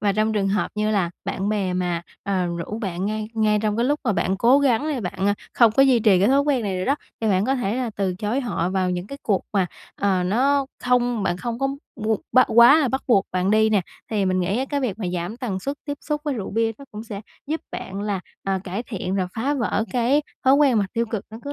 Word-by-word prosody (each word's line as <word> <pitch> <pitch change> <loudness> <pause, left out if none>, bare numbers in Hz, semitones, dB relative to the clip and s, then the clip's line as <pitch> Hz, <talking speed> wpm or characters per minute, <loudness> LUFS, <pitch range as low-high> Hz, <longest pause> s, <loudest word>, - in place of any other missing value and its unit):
Và 200 -1 +2
trong 215 +2 +1
trường 200 -2 +1
hợp 205 +1 0
như 215 0 0
là 190 -5 +1
bạn 195 +2 -2
bè 200 -4 0
mà, 175 -2 -1 0.2
ờ, 190 -3 0
rủ 170 +5 -4
bạn 190 -3 -3
ngay 215 0 -3
ngay 215 -1 +2
trong 210 0 0
cái 235 - +1
lúc 290 +3 +1
mà 220 - +2
bạn 190 0 0
cố 245 +7 +5
gắng 270 -3 +2
đây 280 -5 -1
bạn, 190 0 -2
à, 205 - +3 0.2
không 230 -3 +5
có 270 - +5
duy 260 -3 +5
trì 210 -4 +5
cái 200 +5 +3
thói 275 +1 +4
quen 280 -4 +1
này 195 -3 -2
nữa 185 - -2
đó, 275 - +2 0.3
thì 220 - -1
bạn 190 0 +2
có 265 +2 +1
thể 230 -4 -1
là 250 -3 -2
từ 190 -2 0
chối 215 +8 -1
họ 185 -8 -1
vào 185 -1 0
những 180 +1 -3
cái 275 +4 -8
cuộc 200 -4 +1
mà, 190 -3 +2 0.3
ờ, 190 -2 +1
nó 265 +8 +2 0.2
không 245 -3 +2
bạn 175 -2 0
không 235 +5 -4
có 270 0 +1 0.3
bu 220 -1 0
bắt 255 - +6
quá 235 +7 +8
là 275 -5 +2
bắt 265 +2 -2
buộc 200 -6 +3
bạn 185 +1 +1
đi 220 +1 +4
nè. 205 -3 +3 0.3
Thì 205 -3 +1
mình 185 0 +1
nghĩ 190 +6 0
á 265 - 0
cái 285 -1 0
việc 225 -5 -2
mà 195 - -3
giảm 175 +6 -3
tần 200 -7 -3
suất 280 +5 -3
tiếp 285 -1 -4
xúc 300 -1 -2
với 290 -3 -1
rượu 205 -5 -5
bia 225 +1 +1
nó 280 - -11
cũng 215 +2 -8
sẽ 205 -3 -6 0.3
giúp 315 +2 -2
bạn 195 +1 -5
là, 200 -3 -2 0.2
ờ, 195 -1 0
cải 195 +5 -3
thiện 195 -4 -4
và 185 -1 0
phá 275 +6 0
vỡ 225 -3 0
cái 255 +4 +2 0.2
thói 265 +1 +6
quen 280 -6 +4
mà 200 - +1
tiêu 230 0 0
cực 220 -3 -4
nó 220 - -8
cứ 285 - -4
215 Hz, 270 wpm, -23 LUFS, 195-250 Hz, 0.3 s, quá